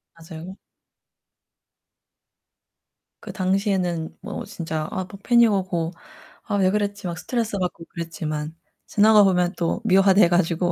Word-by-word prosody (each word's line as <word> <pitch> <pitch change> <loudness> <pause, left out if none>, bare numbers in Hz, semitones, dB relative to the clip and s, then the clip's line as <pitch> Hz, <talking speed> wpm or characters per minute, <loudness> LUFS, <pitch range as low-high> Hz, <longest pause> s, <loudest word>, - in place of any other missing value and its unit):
맞아요. 165 +3 -10 2.7
그 - - -8
당시에는 185 -3 -1
뭐 205 +1 -6
진짜 160 -6 -4
아 190 -2 -2
막 200 -1 -12
패닉 235 -2 +5
오고 180 -4 -1 0.5
'아 205 - -3
왜 190 -2 +3
그랬지.' 205 -2 -2
막 170 -1 -4
스트레스 225 +1 -2
받고 180 -2 -3
그랬지만 160 -2 -5 0.3
지나가보면 200 -4 +4
또 170 +6 -1
미화돼 195 -1 +5
가지고. 175 0 +1
185 Hz, 250 characters per minute, -23 LUFS, 170-205 Hz, 2.7 s, 패닉